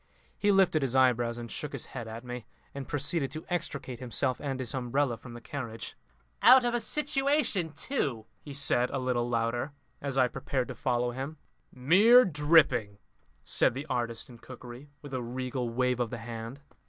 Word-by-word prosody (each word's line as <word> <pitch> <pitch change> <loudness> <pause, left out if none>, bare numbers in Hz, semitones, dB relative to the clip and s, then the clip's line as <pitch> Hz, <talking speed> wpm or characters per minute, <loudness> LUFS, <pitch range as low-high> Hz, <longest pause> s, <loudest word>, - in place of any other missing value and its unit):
He 205 - +2
lifted 190 -5 +4
his 135 -2 -1
eyebrows 120 -2 +3
and 120 -1 -7
shook 150 -1 -5
his 135 - -4
head 120 -3 -5
at 115 +2 -7
me, 125 -2 -7 0.3
and 140 -2 -6
proceeded 145 0 -1
to 155 - -6
extricate 140 -8 -3
himself 130 +1 -1
and 135 -2 -3
his 125 -3 -3
umbrella 130 0 0
from 120 +1 -12
the 120 - -9
carriage. 115 -3 -6 0.5
"Out 255 -1 +8
of 240 - +1
a 240 - +1
situation 280 - +1
too!" 135 - -2
he 145 - -11
said 135 -3 +1
a 135 - -2
little 125 -2 0
louder 120 +4 -1 0.3
as 140 -1 -3
I 130 - +5
prepared 130 +1 -3
to - - -5
follow 120 -1 0
him. 135 +5 -5 0.3
"Mere 200 - +6
dripping!" 145 - +3 0.5
said - - +2
the 135 +3 -4
artist 120 -2 -2
in 120 -2 -14
cookery, 125 +3 -11
with 145 -2 -9
a 130 - -1
regal 125 0 -3
wave 125 +1 0
of 120 -2 0
the 120 - -5
hand. 115 +3 -7
130 Hz, 180 wpm, -29 LUFS, 120-145 Hz, 0.5 s, Out